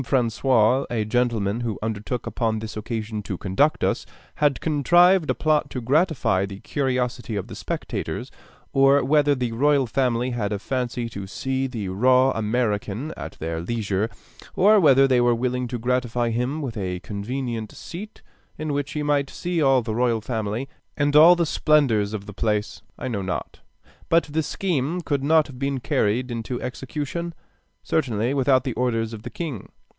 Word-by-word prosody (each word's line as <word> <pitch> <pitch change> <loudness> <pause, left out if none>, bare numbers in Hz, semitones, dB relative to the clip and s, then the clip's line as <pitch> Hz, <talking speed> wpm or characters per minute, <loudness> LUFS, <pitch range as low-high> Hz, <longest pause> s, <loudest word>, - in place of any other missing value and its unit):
François, 125 0 +2
a 110 -3 -1
gentleman 115 -2 0
who 115 -4 -3
undertook 110 +3 -3
upon 110 -2 -1
this 110 0 -6
occasion 110 0 -4
to 100 -2 -5
conduct 100 - +1
us, - - +1 0.3
had 145 -3 +2
contrived 175 +3 +4
a - - +2
plot 155 -1 +1
to 130 - -4
gratify 135 - +2
the 100 0 -6
curiosity 125 -4 -2
of 100 -2 -2
the 115 - -10
spectators, 100 -1 -4 0.4
or 135 +1 +5
whether 145 +1 +3
the 125 -3 -2
royal 140 +3 +3
family 125 0 0
had 110 -4 -2
a 105 - 0
fancy 120 +1 -3
to 100 -4 -7
see 135 +4 -2
the 115 -6 -5
raw 130 +7 +4
American 110 +3 -1
at - - -7
their 80 +1 -4
leisure, 105 +1 -1 0.5
or 210 +3 +6
whether 135 -5 +6
they 130 -2 +3
were 120 -1 +3
willing 125 +1 -1
to 120 - -4
gratify 120 0 0
him 125 +7 -2
with 125 -5 -4
a 90 -3 -3
convenient 115 +2 -4
seat, 200 +5 -9 0.3
in 155 -1 -3
which 140 -1 -2
he 150 - -2
might 145 -2 +1
see 175 -2 -2
all 135 -3 +4
the 110 - -3
royal 120 0 +1
family, 110 +2 -3 0.3
and 145 0 +1
all 165 +4 +9
the 170 -1 +1
splendors 135 -11 +2
of 105 -2 -5
the 105 - -9
place, 105 0 -1 0.2
I - - -5
know 110 -6 -2
not; 95 -1 -4 0.5
but 165 0 +4
the 150 +2 -2
scheme 165 0 -1
could 145 -4 -1
not 155 +1 +4
have 130 -4 -11
been 135 -1 -1
carried 120 +2 0
into 120 +1 -4
execution, 150 +6 -4 0.5
certainly, 120 -5 0
without 130 -2 +3
the 130 - -2
orders 115 -2 -1
of 110 - -7
the - - -7
king. 150 - -6
125 Hz, 170 wpm, -24 LUFS, 110-140 Hz, 0.5 s, all